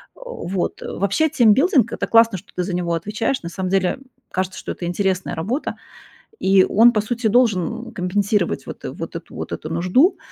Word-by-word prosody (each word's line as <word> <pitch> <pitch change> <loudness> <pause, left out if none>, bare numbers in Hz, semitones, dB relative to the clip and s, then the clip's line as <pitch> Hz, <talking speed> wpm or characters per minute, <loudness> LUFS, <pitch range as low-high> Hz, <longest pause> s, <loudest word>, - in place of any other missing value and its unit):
Вот. 485 - -4
Вообще, 200 - 0
тимбилдинг- 250 - +4
это - - -2
классно, 230 -3 +4
что 200 - -22
ты 180 - -1
за 180 0 -4
него 175 -1 -1
отвечаешь. 210 +7 -2
На 170 - -5
самом 185 +1 -4
деле, 195 +6 +1 0.3
кажется, 185 0 -2
что - - -5
это 175 - -6
интересная 185 +1 -1
работа, 220 - -3 0.6
и 190 0 +5
он, 235 +3 +6
по 215 - +1
сути, 235 +2 -2
должен 230 0 +1
компенсировать 195 +1 0
вот - - -9
вот - - -6
эту - - -8
вот - - -6
эту 155 - -5
нужду. 185 - +3
200 Hz, 175 wpm, -21 LUFS, 180-235 Hz, 0.6 s, он